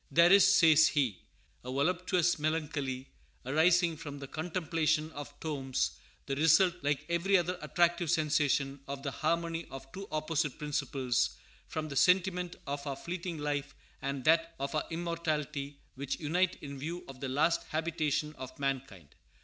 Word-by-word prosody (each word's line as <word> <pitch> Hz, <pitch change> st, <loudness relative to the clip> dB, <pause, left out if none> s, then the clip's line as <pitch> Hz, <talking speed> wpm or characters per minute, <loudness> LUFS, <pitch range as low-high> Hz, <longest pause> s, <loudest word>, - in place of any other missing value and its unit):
"There 170 Hz, +1 st, +6 dB
is," 200 Hz, -1 st, +8 dB
says 160 Hz, -4 st, +7 dB
he, 130 Hz, -, 0 dB, 0.4 s
"a 125 Hz, -, -5 dB
voluptuous 175 Hz, +4 st, +1 dB
melancholy 150 Hz, -4 st, -2 dB, 0.4 s
arising 165 Hz, +4 st, +3 dB
from 145 Hz, -2 st, -7 dB
the 140 Hz, -, -7 dB
contemplation 160 Hz, -1 st, -1 dB
of 145 Hz, -1 st, -9 dB
tombs; 135 Hz, -5 st, -1 dB, 0.3 s
the 135 Hz, -, -2 dB
result, 165 Hz, +5 st, +5 dB
like 145 Hz, -1 st, 0 dB
every 170 Hz, +3 st, +3 dB
other 180 Hz, +1 st, -1 dB
attractive 175 Hz, -1 st, +1 dB
sensation, 145 Hz, -3 st, +1 dB
of 140 Hz, 0 st, -5 dB
the 140 Hz, -, -2 dB
harmony 165 Hz, +2 st, -1 dB
of 135 Hz, 0 st, -10 dB
two 195 Hz, +1 st, -7 dB
opposite 155 Hz, -2 st, -1 dB
principles, 140 Hz, -4 st, -1 dB, 0.3 s
from 155 Hz, -1 st, -4 dB
the 140 Hz, -, -6 dB
sentiment 180 Hz, +2 st, +3 dB
of 140 Hz, +1 st, -4 dB
our 140 Hz, -, -2 dB
fleeting 170 Hz, +3 st, -5 dB
life 145 Hz, -1 st, -3 dB, 0.3 s
and 135 Hz, -1 st, -3 dB
that 165 Hz, +2 st, +3 dB
of 140 Hz, 0 st, -3 dB
our 155 Hz, -, 0 dB
immortality, 155 Hz, -4 st, -3 dB, 0.2 s
which 135 Hz, 0 st, -4 dB
unite 175 Hz, +4 st, +1 dB
in 140 Hz, -1 st, -7 dB
view 170 Hz, +5 st, -5 dB
of 135 Hz, -1 st, -10 dB
the 135 Hz, -1 st, -4 dB
last 155 Hz, +6 st, +2 dB
habitation 155 Hz, -2 st, -1 dB
of 130 Hz, -1 st, -8 dB
mankind. 135 Hz, -, -3 dB
155 Hz, 150 wpm, -31 LUFS, 140-170 Hz, 0.4 s, is